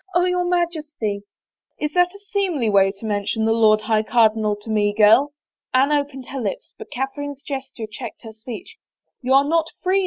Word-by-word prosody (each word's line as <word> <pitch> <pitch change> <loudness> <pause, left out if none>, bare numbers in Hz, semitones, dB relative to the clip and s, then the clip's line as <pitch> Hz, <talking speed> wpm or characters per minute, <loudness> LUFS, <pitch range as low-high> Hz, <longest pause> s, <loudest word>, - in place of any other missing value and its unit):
Oh, 355 0 +4
your 360 0 +1
Majesty 310 - -1 0.2
— - - -72
" - - -71
" - - -49
Is 300 0 -2
that 355 +1 +2
a - - -12
seemly 345 - 0
way 195 -1 +4
to 200 +3 -12
mention 210 +1 -1
the 225 - +3
Lord 215 -1 +4
High 215 0 +1
Cardinal 220 -2 +2
to 220 - -11
me, 205 -1 +1
girl? 225 +7 +5 0.2
" - - -57
Anne 270 +3 +4
opened 285 -3 -2
her 270 -1 -4
lips 200 -4 -4
but - - -9
Cath 270 +2 -3
erine's 285 -1 -6
gesture 265 -5 -5
checked 220 +2 -9
her 220 -1 -9
speech. 230 - -9 0.2
" - - -56
You 260 +1 +2
are 275 +1 +5
not 325 +1 +1 0.2
free. 375 +2 +3
255 Hz, 220 wpm, -21 LUFS, 215-300 Hz, 0.2 s, girl